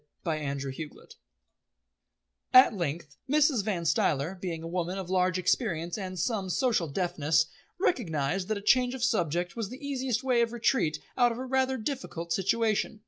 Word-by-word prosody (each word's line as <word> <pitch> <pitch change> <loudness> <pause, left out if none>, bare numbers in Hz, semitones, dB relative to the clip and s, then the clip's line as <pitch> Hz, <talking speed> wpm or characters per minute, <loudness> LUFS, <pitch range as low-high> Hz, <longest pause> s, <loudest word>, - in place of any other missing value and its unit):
CHAPTER 140 -4 -2
II 150 +3 -6 1.7
At 255 -2 +9
length 155 -4 -4
Mrs. 290 -6 +3
Van 190 -5 -2
Stuyler, 150 +1 +1
being 175 -3 -5
a - - -5
woman 180 +2 -2
of 185 -2 -5
large 185 -1 +2
experience 170 -2 0
and 185 -3 -5
some 195 +1 -1
social 215 -4 +1
deftness, 160 -1 +1 0.3
recognised 180 - 0
that 215 - -1
a 200 - -8
change 250 +3 +3
of 255 - -5
subject 175 - 0
was 225 -4 -3
the 250 - -8
easiest 260 -3 -1
way 250 -3 +3
of 235 0 0
retreat 225 - +1 0.2
out 245 -1 +5
of 230 - -5
a 260 - -4
rather 265 0 +1
difficult 215 - -4
situation. 215 +2 0
190 Hz, 160 wpm, -29 LUFS, 165-240 Hz, 1.7 s, At